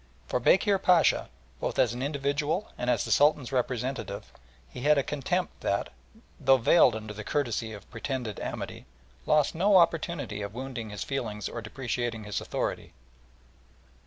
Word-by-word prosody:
For - - -1
Bekir 195 - +4
Pacha, 180 -3 +4 0.3
both - - -3
as 120 -2 +3
an 125 - -5
individual 145 +6 -1
and 125 - -2
as - - +2
the - - -4
Sultan's 145 -3 +3
representative, 125 -4 -2 0.3
he 125 - -9
had 150 +2 +4
a 140 - +3
contempt 175 +7 -2
that, 100 - 0 0.5
though 135 -2 +5
veiled 125 0 +5
under 110 -1 -6
the 105 0 -7
courtesy 120 -4 -1
of 105 -3 -10
pretended 120 -3 -4
amity, - - -6 0.4
lost 150 -2 +3
no 190 +4 +4
opportunity 165 - +1
of 100 +2 -6
wounding 125 -3 -5
his 105 -1 -5
feelings 115 -7 -3
or 120 - -5
depreciating 120 0 -3
his 105 -3 -3
authority. - - -3
130 Hz, 155 wpm, -28 LUFS, 110-150 Hz, 0.5 s, though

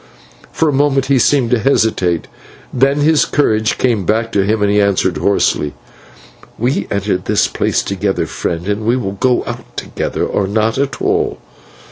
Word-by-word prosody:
For 160 - 0
a 150 - +1
moment 135 -1 +2
he 135 -1 +2
seemed 125 -1 +2
to 125 - +3
hesitate, 110 - +1 0.5
then 135 +3 +2
his 155 +1 +4
courage 110 -6 +1
came 115 -6 +1
back 115 +5 0
to 100 - +2
him, 105 +1 0
and 100 - +2
he 105 0 +3
answered 95 -4 +1
hoarsely: 75 -5 0 0.8
"We 120 -3 -1
entered 100 -2 -1
this 105 - +2
place - - -1
together, 100 0 -1
friend, 85 +2 -4
and 105 +1 -1
we 120 +3 +1
will 100 -6 -3
go 125 +5 +1
out - - -8
together, - - -3
or 100 - -1
not 110 +4 0
at 140 0 -2
all. - - 0
110 Hz, 170 wpm, -16 LUFS, 100-130 Hz, 0.8 s, his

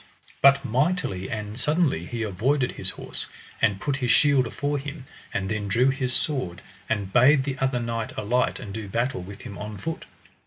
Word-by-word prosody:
But 140 0 +6
mightily 130 - 0
and 105 +1 -5
suddenly 145 - +1
he 115 -2 -3
avoided 125 +7 +1
his - - 0
horse - - -5 0.3
and 105 -4 +3
put 140 -2 -1
his 125 -3 -1
shield 135 0 +4
afore 145 +3 -2
him, 140 0 -7 0.3
and 95 -1 -2
then 105 0 -2
drew 120 +7 +3
his 130 -2 -1
sword, 130 - 0 0.3
and 100 -4 -1
bade 130 +3 +6
the 135 -1 -4
other 130 -2 +1
knight 115 -1 -3
alight 120 +4 +1
and 100 -5 -7
do 110 -1 -5
battle 120 0 -1
with 100 +2 -9
him 100 - -8
on 105 0 -6
foot. 165 - -5
125 Hz, 185 wpm, -25 LUFS, 105-140 Hz, 0.3 s, But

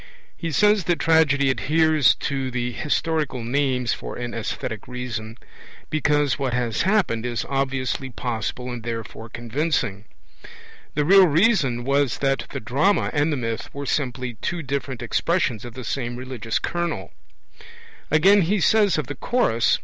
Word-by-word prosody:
He 165 -2 -4
says 210 +3 +3
that 175 0 +2
tragedy 145 -4 +3
adheres 155 0 +3
to 135 -2 -2
'the 125 -1 -2
historical 150 -2 -1
names' 125 0 0
for - - -6
an 120 -1 -5
aesthetic 110 -1 -4
reason, 120 -3 -5 0.5
because 145 -2 +1
what 130 -3 -1
has 120 -3 0
happened 190 - +1
is 120 -1 -2
obviously 135 -1 -1
possible 125 0 -4
and 120 -1 -5
therefore 115 0 -6
convincing. 120 -3 -2 0.9
The 150 0 +1
real 190 +2 +7
reason 155 - +2
was 140 -1 +1
that 135 -3 0
the - - -5
drama 145 - +1
and 150 +1 +2
the 145 - 0
myth 115 -2 -4
were 140 0 -4
simply 125 -4 -2
two 170 -1 -2
different 135 -2 -3
expressions 125 - 0
of 120 -1 -9
the 130 - -7
same 120 +2 -3
religious 125 -3 -3
kernel 175 -1 -3 0.5
(p. - - -16 0.5
44). 155 - +4
Again, 195 +5 +6
he 195 +5 +1
says 205 0 +3
of 155 - -1
the 145 - -5
Chorus 140 - +1
(p. - - -19
135 Hz, 155 wpm, -23 LUFS, 120-160 Hz, 0.9 s, real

